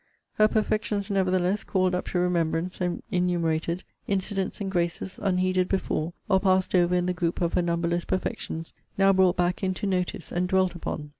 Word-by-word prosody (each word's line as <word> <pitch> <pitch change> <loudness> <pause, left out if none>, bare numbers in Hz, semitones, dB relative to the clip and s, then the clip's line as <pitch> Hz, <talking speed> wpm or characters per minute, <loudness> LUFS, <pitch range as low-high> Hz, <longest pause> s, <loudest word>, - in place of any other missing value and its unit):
Her 215 - +5
perfections, 215 -1 -1
nevertheless, 185 +1 +1
called 185 -3 +1
up 180 - -2
to - - -2
remembrance, 175 0 0
and 180 -1 -1
enumerated; 170 -2 0 0.2
incidents 195 -1 -2
and 195 -2 -3
graces, 175 +1 -2
unheeded 185 -1 +1
before, 170 -3 -1
or 190 - +4
passed 185 -1 +2
over 180 -1 +4
in 180 0 +1
the 180 - 0
group 170 -1 -1
of 170 -1 0
her - - +3
numberless 170 0 0
perfections, 165 -3 -3 0.2
now 195 0 +5
brought 190 -1 +4
back 175 0 +1
into 185 +1 -1
notice, 180 -3 -2
and 180 +1 0
dwelt 185 -1 +2
upon! 155 -3 -5
180 Hz, 170 wpm, -26 LUFS, 175-190 Hz, 0.2 s, Her